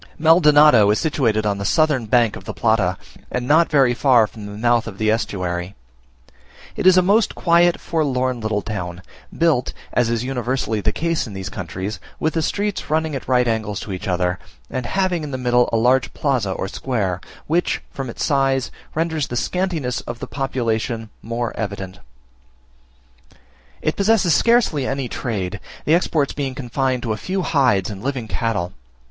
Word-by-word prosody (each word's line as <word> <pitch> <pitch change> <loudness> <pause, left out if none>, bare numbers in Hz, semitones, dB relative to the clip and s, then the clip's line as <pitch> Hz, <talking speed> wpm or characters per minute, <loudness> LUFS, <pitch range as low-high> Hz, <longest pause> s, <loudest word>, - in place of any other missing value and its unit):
MALDONADO 150 - +6
is 105 - +3
situated 115 -9 +1
on 100 -1 0
the 100 - 0
northern 150 -7 +2
bank 115 -2 +3
of 95 - -10
the - - -6
Plata, 100 -5 +1 0.3
and 125 0 -3
not 160 +4 +4
very 135 -5 +4
far 120 -2 +4
from 105 0 -10
the 100 - -8
mouth 120 +1 +2
of 100 -4 -7
the 110 0 +2
estuary. 90 -4 -2 1.0
It - - +1
is 185 0 +7
a 185 - +6
most 205 +4 +2
quiet, 170 0 +3
forlorn, 130 -6 -1
little 110 -2 -1
town; 90 -4 -5 0.3
built, 160 -7 +2 0.2
as 120 -2 +2
is 115 0 0
universally 125 -3 -2
the 105 - +1
case 165 +2 -1
in 105 - -9
these 95 0 -5
countries, 95 +6 -5 0.2
with 160 - 0
the 165 - 0
streets 205 +5 -2
running 155 -1 0
at 135 - -6
right 125 -1 +3
angles 110 -3 -1
to 105 - -7
each 90 - -6
other, 90 -1 0 0.3
and 130 -2 -3
having 185 -2 0
in 150 - -5
the 130 - -3
middle 125 -1 +2
a 115 - +2
large 125 +3 +3
plaza 125 -9 0
or 95 - -3
square, 100 -6 -2 0.2
which, 170 +3 0
from 135 -2 -5
its - - -3
size, 135 -3 +1 0.2
renders 160 -2 -1
the 120 - -5
scantiness 160 -4 -1
of 120 - -5
the - - -6
population 115 -4 -2
more 115 +1 -3
evident. 95 -3 -5 1.8
It 155 - 0
possesses 200 -4 +3
scarcely 230 - +3
any 135 -1 -2
trade; 105 -5 -3 0.3
the 155 - +3
exports 160 -4 +1
being 135 -3 -3
confined 130 0 -1
to 110 - -1
a - - -4
few 185 - -2
hides 125 - +2
and 100 -1 -8
living 130 -2 -3
cattle. 105 -7 -2
125 Hz, 175 wpm, -21 LUFS, 110-150 Hz, 1.8 s, is